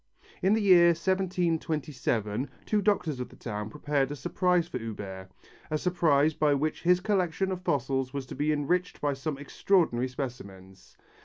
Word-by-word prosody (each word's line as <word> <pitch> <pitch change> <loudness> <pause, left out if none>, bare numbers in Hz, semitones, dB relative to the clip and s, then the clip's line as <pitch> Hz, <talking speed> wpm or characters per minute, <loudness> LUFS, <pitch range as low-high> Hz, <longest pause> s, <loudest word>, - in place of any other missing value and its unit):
In 190 +3 +3
the 220 - +2
year 180 -3 +7
1727 160 - -1 0.2
two 210 -1 +1
doctors 180 -9 0
of 125 - -5
the - - -15
town 105 -2 -5
prepared 145 0 -1
a 145 - -4
surprise 180 +5 +1
for 130 - -5
Huber, 100 -4 -7 0.4
a 155 - 0
surprise 155 -3 +2
by 150 -1 +2
which 155 +3 -2
his 180 +1 +4
collection 190 -1 0
of 185 -1 -4
fossils 135 -4 -1
was 140 -1 -4
to - - -8
be 145 +3 0
enriched 175 +5 -1
by 145 -1 0
some 140 +2 -4
extraordinary 140 -3 +1
specimens. 100 -8 -8
150 Hz, 160 wpm, -28 LUFS, 130-180 Hz, 0.4 s, year